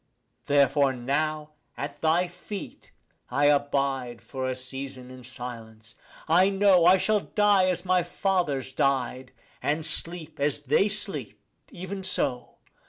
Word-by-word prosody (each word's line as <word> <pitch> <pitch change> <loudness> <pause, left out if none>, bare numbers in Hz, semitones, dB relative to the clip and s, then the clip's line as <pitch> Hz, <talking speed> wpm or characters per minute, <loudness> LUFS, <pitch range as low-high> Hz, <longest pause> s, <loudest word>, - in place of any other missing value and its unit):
Therefore 140 -1 +3
now 150 +4 -2 0.3
at 145 +1 -6
thy 165 +3 +2
feet 180 +3 -9 0.4
I 140 +3 +1
abide 140 -4 +1
for 130 -1 -4
a 130 - -2
season 130 0 -6
in 130 -1 -11
silence. 115 -2 -8 0.3
I 180 +4 +5
know 195 -3 +4
I 185 +2 +7
shall 215 +2 +2
die 205 -2 +3
as 180 0 -2
my 185 0 +3
fathers 175 -7 -1
died, 130 -1 0 0.3
and 155 +2 -1
sleep 165 -3 -2
as 145 0 0
they 150 +9 +2
sleep; 205 0 -2 0.3
even 190 +2 -7
so. 135 -9 -1
145 Hz, 130 wpm, -26 LUFS, 130-180 Hz, 0.4 s, I